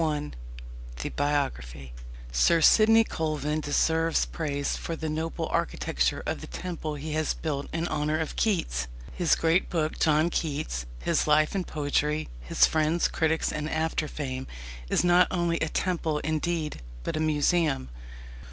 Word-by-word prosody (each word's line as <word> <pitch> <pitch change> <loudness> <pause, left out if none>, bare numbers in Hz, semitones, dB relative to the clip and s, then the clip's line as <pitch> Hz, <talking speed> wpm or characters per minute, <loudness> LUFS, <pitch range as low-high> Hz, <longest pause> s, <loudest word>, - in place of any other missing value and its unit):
KEATS 160 - +2
1. 150 -1 -3 0.7
THE - - -2
BIOGRAPHY 70 - -2 0.4
Sir 60 - +4
Sidney 225 +7 +6
Colvin 155 -4 -2
deserves 160 +2 +2
praise 145 -3 -2
for 165 - -4
the 160 -1 -4
noble 160 +2 -2
architecture - - 0
of - - -3
the - - -8
temple 165 -4 -5
he 150 +2 -5
has 155 0 0
built 145 -3 -3
in 165 +1 -1
honour 155 0 0
of 160 -1 -3
Keats. 65 - 0 0.3
His 175 -3 +3
great 165 +3 +2
book, 160 -2 -1
John 155 +2 +3
Keats: 145 - -2 0.2
His - - +1
Life 155 0 +4
and 190 -3 -2
Poetry; 150 +1 -1
His - - +3
Friends, 160 +2 +2
Critics, 160 0 0
and 150 0 -3
After 160 0 -1
fame, 130 -3 -5 0.4
is - - +2
not 175 0 +5
only 170 -2 0
a 160 - -1
temple, 165 -4 -1
indeed, 155 - -2 0.2
but - - -3
a - - -1
museum. 155 - +1
155 Hz, 150 wpm, -27 LUFS, 145-165 Hz, 0.7 s, Sidney